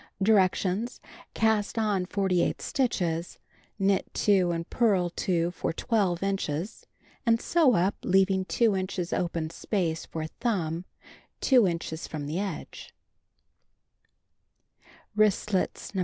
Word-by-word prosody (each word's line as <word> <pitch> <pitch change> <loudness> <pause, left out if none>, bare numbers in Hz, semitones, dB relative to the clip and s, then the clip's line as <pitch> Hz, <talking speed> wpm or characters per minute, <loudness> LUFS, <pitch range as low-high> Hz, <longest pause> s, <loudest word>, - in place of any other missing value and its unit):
Directions: 195 +1 +2 0.4
Cast 220 -1 +1
on 205 -5 +1
48 190 -3 +1
stitches, 175 -10 -1 0.4
knit 195 -1 +1
2 190 -4 +3
and 165 -1 -2
purl 195 -7 +2
2 170 -1 0
for 175 - -2
12 190 -2 0
inches, 195 -1 -3 0.4
and 230 -1 +3
sew 305 -6 +3
up 185 +4 +2
leaving 190 0 +3
2 225 0 +2
inches 185 -2 -3
open 165 -2 -2
space 165 -3 -2
for 160 -1 -4
thumb 170 -3 -2 0.6
2 250 -7 +5
inches 165 -1 -4
from 150 -2 -5
the 155 +5 -2
edge. 200 -1 -6 2.2
WRISTLETS 210 -2 +1
No. 190 - -2
190 Hz, 110 wpm, -27 LUFS, 170-210 Hz, 2.2 s, 2